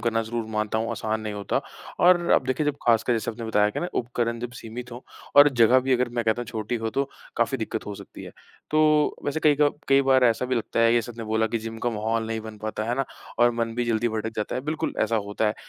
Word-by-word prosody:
करना 115 0 0
ज़रूर 115 0 -4
मानता 110 0 -1
हूँ 115 - -2
आसान 110 0 -2
नहीं 110 -1 -4
होता 100 -1 -1 0.4
और 180 0 +6
अब - - +3
देखिए, 130 +3 0
जब 145 -1 0
खासकर 115 +1 +3
जैसे 115 -1 -1
आपने 115 +1 -7
बताया 105 -2 +2
कि - - -4
ना, 175 - -1
उपकरण 120 -1 -2
जब 120 0 -5
सीमित 125 +1 -8
हों 120 - -7 0.4
और 145 +1 +10
जगह 125 -1 +5
भी 130 +1 0
अगर, 125 0 +2
मैं 120 -1 -2
कहता 110 +1 +1
हूँ - - -10
छोटी 110 0 -4
हो, 115 -1 -3
तो 135 +4 -1 0.3
काफ़ी 120 +3 +1
दिक्कत 110 0 -4
हो 105 - -5
सकती - - -11
है। - - -9 0.4
तो 155 -1 +3
वैसे 145 +2 -1
कई 150 -2 +5
का 145 - +6 0.2
कई 135 0 +5
बार 130 -1 +4
ऐसा 115 0 +2
भी 130 - 0
लगता 115 0 -1
है, 115 0 +5
जैसे 120 0 0
आपने 115 0 -7
बोला 110 +1 +1
कि 115 +1 -2
जिम 115 0 -7
का 120 - -1
माहौल 110 +1 -1
नहीं 110 0 -3
बन 110 -1 -9
पाता, 110 0 -4
है 120 +2 -1
ना? 135 +2 0 0.3
और 120 0 +5
मन 115 -1 -2
भी 120 +1 -1
जल्दी 120 0 +1
भटक 110 0 -3
जाता 105 - -2
है, - - -1
बिल्कुल, 150 +3 -2
ऐसा 115 +1 +1
होता 105 +2 -1
है। 105 - 0
115 Hz, 265 wpm, -25 LUFS, 110-125 Hz, 0.4 s, और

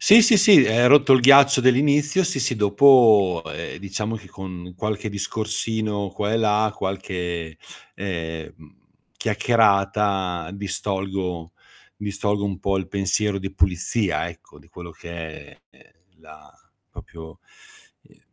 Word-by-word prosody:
Sì, 215 +3 +7
sì, 225 0 +5
sì, 200 -5 +6
ehm, 120 +2 +3
rotto 140 0 +5
il 130 - +5
ghiaccio 140 +1 +6
dell'inizio, 145 +7 +2
sì, 170 -5 -2
sì, 125 0 -1
dopo, 105 -4 +4
ehm, - - -8
diciamo 105 +4 -5
che 105 -3 -14
con 90 -2 -10
qualche 105 +1 -4
discorsino 105 0 -4
qua 105 +3 -4
e - - +1
là, 110 -1 0
qualche, 90 -4 -5 0.4
ehm, 80 -4 -6
mhmm, 80 -1 -20 0.4
chiacchierata, 100 -5 0
distolgo 95 -3 -4 0.4
distolgo 100 0 -1
un 100 -3 -4
po' 100 0 -2
il 95 - -5
pensiero 100 +1 -1
di 95 0 -8
pulizia 95 +3 0
ecco, - - -16
di - - -22
quello 85 -1 -12
che 85 - -14 0.4
è - - -23
è - - -25 0.2
la 80 -1 -18 0.4
proprio 80 +1 -13 0.6
ehm, - - -26
100 Hz, 135 wpm, -21 LUFS, 90-115 Hz, 0.6 s, Sì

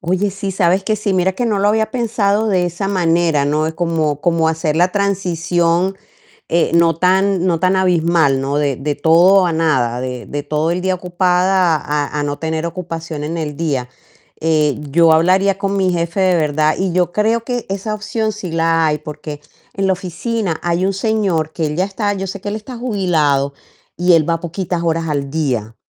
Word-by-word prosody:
Oye, 185 +3 0
sí, 195 0 -4
sabes 185 0 +1
que 215 - +1
sí, 205 -1 -1
mira 185 +1 +2
que 240 +6 -2
no 210 -3 0
lo 200 +1 +2
había 220 +1 +1
pensado 220 -3 0
de 185 -3 +1
esa 175 +3 -4
manera, 170 -5 +1
¿no? 155 +2 0
Como 160 -4 -1
como 165 -1 +2
hacer 160 -1 -1
la 180 +2 +2
transición, 180 -2 0 0.5
eh, 170 - +2
no 170 -1 +4
tan 185 +1 +2
no 170 -3 +1
tan 185 +1 +2
abismal, 170 -6 +2
¿no? 140 +2 -1
De 140 -3 0
de 145 +1 -2
todo 180 +5 +5
a 175 - 0
nada, 130 -7 +1
de 125 -2 -5
de 145 0 -5
todo 155 +3 -1
el 180 +1 -2
día 185 0 0
ocupada 180 0 +1
a 150 0 -2
a - - -1
no 145 0 -3
tener 160 +1 -2
ocupación 165 -3 -5
en 160 +3 -3
el 150 -3 -4
día, 140 -7 -2 0.5
eh, 155 -3 +1
yo 165 +2 +4
hablaría 185 +4 +3
con 200 0 -2
mi 185 -1 +2
jefe, 170 +2 -1
de 185 -1 +3
verdad, 155 -1 +1
y 190 -2 -1
yo 180 -1 +1
creo 225 +4 +1
que 245 -1 -3
esa 200 +2 -3
opción 215 +1 -2
sí 200 -5 -7
la 165 0 +2
hay, 150 0 0
porque 150 0 -8 0.3
en 195 0 -1
la 190 - +3
oficina 185 0 -3
hay 175 +1 0
un 195 - 0
señor 195 -6 0
que 160 0 -2
él 150 - -4
ya 180 +3 +1
está 205 +1 -2
yo 195 -1 -4
sé 200 +2 -6
que 205 - -4
él 205 - -3
está 225 +3 -8
jubilado, 165 - 0 0.4
y 180 0 +3
él 160 -3 +4
va 165 0 +1
poquitas 175 +1 -3
horas 165 0 0
al 140 -2 -2
día, 125 -8 -2
175 Hz, 200 wpm, -17 LUFS, 155-195 Hz, 0.5 s, todo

